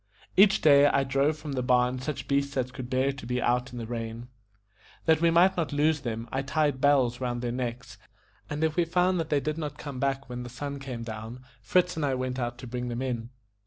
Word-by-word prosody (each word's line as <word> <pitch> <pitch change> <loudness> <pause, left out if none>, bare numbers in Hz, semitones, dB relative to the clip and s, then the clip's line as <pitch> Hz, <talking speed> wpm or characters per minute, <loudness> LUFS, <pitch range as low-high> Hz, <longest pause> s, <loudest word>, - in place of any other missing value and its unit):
Each 195 0 +6
day 145 -1 +7
I 140 -1 +2
drove 135 +3 +1
from 150 -1 -7
the 130 -2 -1
barn 125 0 +2
such 140 +2 -4
beasts 140 0 0
as 130 -1 -1
could 125 -1 -7
bear 130 +1 +2
to 135 -3 -9
be 125 0 -1
out 125 +1 0
in 125 - -8
the 115 - -4
rain. 115 +1 -5 0.8
That 160 -1 +4
we 170 - +5
might 175 +3 +5
not 165 -3 -1
lose 150 +2 +2
them, 115 -1 -4
I 135 - -1
tied 145 -1 0
bells 130 -4 +3
round 120 -1 -2
their 120 - -1
necks; 125 -1 -5 0.5
and 150 +2 -2
if 160 -1 +1
we 175 - +3
found 180 +2 +1
that 160 -1 -2
they 145 - +2
did 155 +3 -3
not 150 -2 -4
come 140 -4 -7
back 135 0 -1
when 125 0 -5
the 125 - -7
sun 140 +3 -5
went 120 -3 -5
down, 115 +3 -7 0.2
Fritz 180 +10 +2
and 160 - -1
I 135 -2 +1
went 130 0 -3
out 120 -1 -3
to 125 - -9
bring 125 0 -4
them 120 +1 -3
in. 120 -3 -3
130 Hz, 235 wpm, -28 LUFS, 125-150 Hz, 0.8 s, day